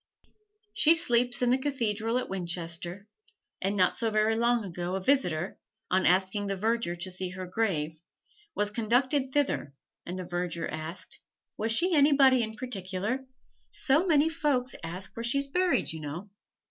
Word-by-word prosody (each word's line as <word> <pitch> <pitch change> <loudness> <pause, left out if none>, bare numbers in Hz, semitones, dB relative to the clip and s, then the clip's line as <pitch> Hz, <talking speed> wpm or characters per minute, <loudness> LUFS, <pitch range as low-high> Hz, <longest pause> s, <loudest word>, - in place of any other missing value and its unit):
She 325 +2 +5
sleeps 245 -4 +2
in 245 - +3
the 255 - +3
cathedral 230 -5 -1
at 255 - -2
Winchester, 175 +1 -4 0.5
and 195 +2 0
not 185 -2 +3
so 230 -1 0
very 215 +1 +2
long 235 0 +2
ago 175 0 -4
a - - -1
visitor, 185 - +1 0.3
on 185 +1 +3
asking 190 +3 +2
the 195 - -1
verger 220 -2 0
to 175 +2 -4
see 185 0 -2
her 185 +1 -6
grave, 165 -6 -1 0.5
was 205 0 0
conducted 255 +5 +1
thither, 265 - -1 0.3
and 180 +2 -6
the 185 - -5
verger 175 -1 -3
asked: 155 +2 -7 0.4
"Was 225 +1 -1
she 345 +10 +3
anybody 280 -4 +5
in 220 -1 -3
particular? 215 +2 -3 0.4
So 305 +7 +2
many 305 -2 +4
folks 290 -6 0
ask 180 +4 -6
where 230 - -5
she's 275 +4 +1
buried, 360 +6 +1
you 160 - -6
know!" 160 +7 -7
215 Hz, 160 wpm, -29 LUFS, 180-260 Hz, 0.5 s, She